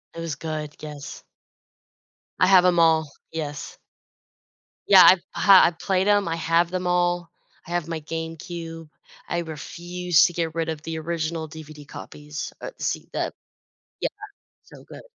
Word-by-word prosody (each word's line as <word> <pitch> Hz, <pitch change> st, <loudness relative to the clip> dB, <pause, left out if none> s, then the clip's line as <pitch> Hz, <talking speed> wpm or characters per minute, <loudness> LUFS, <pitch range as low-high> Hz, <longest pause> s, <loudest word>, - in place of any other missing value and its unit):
It -, -, -7 dB
was 165 Hz, -3 st, -3 dB
good, 155 Hz, 0 st, -5 dB
yes. 150 Hz, -2 st, -8 dB, 1.2 s
I -, -, +6 dB
have 185 Hz, -1 st, +6 dB
'em 175 Hz, -1 st, +4 dB
all. 160 Hz, -2 st, +4 dB, 0.2 s
Yes. 150 Hz, -2 st, -5 dB, 1.1 s
Yeah, 190 Hz, -2 st, +9 dB
I've 185 Hz, -1 st, +7 dB
ha 195 Hz, -2 st, +7 dB
I've 170 Hz, -, -1 dB
played 190 Hz, 0 st, +1 dB
'em. 205 Hz, -2 st, +3 dB
I 165 Hz, -, -1 dB
have 165 Hz, +1 st, +2 dB
them 180 Hz, 0 st, -3 dB
all. 175 Hz, -1 st, +1 dB, 0.4 s
I -, -, -9 dB
have 175 Hz, -2 st, -1 dB
my 165 Hz, -2 st, -4 dB
GameCube. 165 Hz, 0 st, -6 dB, 0.4 s
I 175 Hz, -, 0 dB
refuse 175 Hz, +2 st, 0 dB
to 175 Hz, -, -1 dB
get 165 Hz, -2 st, -2 dB
rid 165 Hz, -1 st, -1 dB
of 160 Hz, -2 st, -4 dB
the 160 Hz, 0 st, -5 dB
original 160 Hz, 0 st, -3 dB
DVD 155 Hz, -1 st, -11 dB
copies. 150 Hz, 0 st, -7 dB
Uh, -, -, -6 dB
see -, -, -2 dB
that -, -, -2 dB, 0.7 s
Yeah. -, -, +1 dB, 0.6 s
So -, -, -15 dB
good. -, -, -12 dB
165 Hz, 155 wpm, -24 LUFS, 155-175 Hz, 1.2 s, Yeah